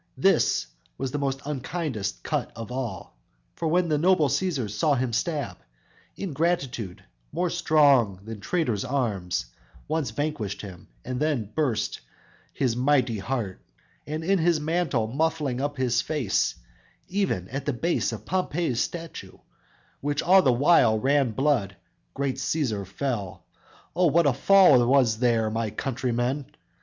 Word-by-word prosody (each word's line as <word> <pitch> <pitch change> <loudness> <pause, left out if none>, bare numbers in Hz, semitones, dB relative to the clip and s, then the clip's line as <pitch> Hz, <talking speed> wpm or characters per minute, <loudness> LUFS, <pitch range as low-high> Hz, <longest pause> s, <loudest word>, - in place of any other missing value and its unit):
This - - +3 0.3
was 135 -1 -3
the 145 - -2
most 135 -1 -2
unkindest 135 - -3
cut - - -2
of 115 +1 -7
all; 120 - -5 0.4
For 165 - -2
when 175 +2 +2
the 150 -2 +1
noble 165 -3 +4
Cæsar 140 - 0
saw 145 - +1
him 125 -2 -1
stab, 140 - -2 0.6
Ingratitude, 140 - -2 0.3
more 175 +2 -1
strong 140 - +3
than 110 0 -7
traitors' 120 - -1
arms 105 - -1 0.4
Quite 155 -2 -1
vanquished 145 -11 -3
him, 95 -4 -10 0.2
then 130 -5 -1
burst 115 -8 -1 0.5
his 125 -4 0
mighty 125 -3 +2
heart; 110 -4 -3 0.5
And 155 +2 -3
in 195 +3 +2
his 165 -1 +3
mantle 155 -6 0
muffling 145 0 -1
up 145 0 -2
his 125 -2 +1
face, 150 -9 0 0.5
Even 185 - -1
at 135 +2 -5
the - - +3
base 165 +8 0
of - - -7
Pompey's 175 -8 -1
statue, 165 -2 -6 0.6
Which 145 +1 -1
all 190 +2 +6
the 135 - +3
while 125 -3 +4
ran 135 +3 +2
blood, 125 -7 +1 0.4
great 135 -1 -1
Cæsar 110 - -1
fell. 105 -4 -4 0.5
O, 180 0 +4
what 165 +2 +3
a 140 - +4
fall 150 -3 +6
was 125 -5 +3
there, 115 -3 +2
my 115 0 -1
countrymen! 125 +3 -2
135 Hz, 140 wpm, -26 LUFS, 115-155 Hz, 0.6 s, all